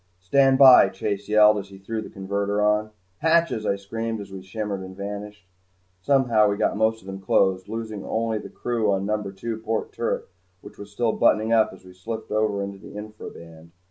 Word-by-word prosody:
"Stand 135 +9 +3
by!" 130 -7 +8
Chase 100 +1 -4
yelled 105 0 +6
as 100 0 -9
he 95 - -12
threw 110 +3 -5
the - - -9
converter 100 +1 -2
on. 105 +1 +2 0.3
"Hatches!" 160 -8 +2
I - - +2
screamed 115 +3 -4
as 100 -1 -9
we 95 -1 -8
shimmered 100 +1 -4
and 95 0 -10
vanished. 105 0 -7 0.6
Somehow 120 -4 +3
we 100 - -1
got - - +1
most 110 +1 +1
of - - -19
them 95 0 -7
closed, 95 0 +1
losing 110 -3 -5
only 110 -1 -1
the - - -9
crew 115 -4 -1
on 95 0 0
number 105 -1 -2
two 110 +3 -5
port 110 0 -3
turret - - -2 0.4
which - - -14
was 100 0 -9
still 115 +2 0
buttoning 110 +1 +2
up 110 -1 +4
as 95 0 -15
we 90 - -13
slipped 110 +5 -7
over 105 -2 0
into 100 0 -7
the - - -12
infra 105 +1 -8
band. 85 0 -14
105 Hz, 205 wpm, -24 LUFS, 95-110 Hz, 0.6 s, by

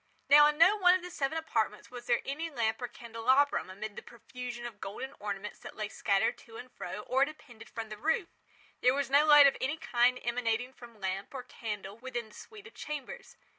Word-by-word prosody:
Now 295 +1 +9
in 300 0 0
no 355 +6 +6
one 360 -2 +6
of 370 - -3
the 360 - -7
seven 285 0 -2
apartments 225 -10 -2
was 245 -1 -9
there 240 -1 +2
any 310 +5 -3
lamp 230 -5 -1
or 245 - -2
candelabrum, 240 +2 +1
amid 205 +2 -7
the - - -7
profusion 240 +1 -8
of 220 -4 -8
golden 250 +8 -6
ornaments 205 0 -5
that - - -10
lay 215 -1 -4
scattered 200 0 +1
to 225 -1 -13
and 250 - -10
fro 210 - -6
or 260 +5 +2
depended 245 -7 -8
from 225 -2 -6
the 215 - -7
roof. 320 - 0 0.5
There 250 +1 +4
was 280 -1 -2
no 285 +2 +6
light 295 -2 +9
of 275 - +4
any 285 +5 -1
kind 250 -4 +2
emanating 240 +1 -1
from 235 -4 -14
lamp 190 +5 -4
or 255 - -5
candle 210 -3 -7
within 240 -3 -5
the - - -19
suite 425 -2 -12
of 450 - -13
chambers. 300 - -7
245 Hz, 210 wpm, -31 LUFS, 225-285 Hz, 0.5 s, Now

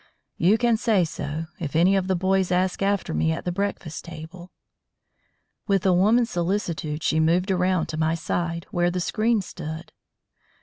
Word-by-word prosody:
You 190 +6 +4
can 235 -1 +2
say 215 -6 +2
so, 155 0 -5
if 155 -4 -5
any 180 +4 +4
of 190 -1 0
the 190 - +1
boys 190 +1 +1
ask 180 +1 +1
after 200 - 0
me 80 +1 +1
at - - -4
the 180 - 0
breakfast 195 -4 -3
table." 170 +2 -10 1.2
With 195 -3 +1
a 185 - +5
woman's 225 +6 +3
solicitude 170 -4 -2
she 160 - +2
moved 175 +5 +2
around 180 -2 +1
to 155 - -4
my 160 +1 +1
side, 170 +1 -3
where 175 -3 +2
the 180 +1 -2
screen 215 +3 +1
stood. 160 -1 -7
180 Hz, 170 wpm, -24 LUFS, 160-195 Hz, 1.2 s, a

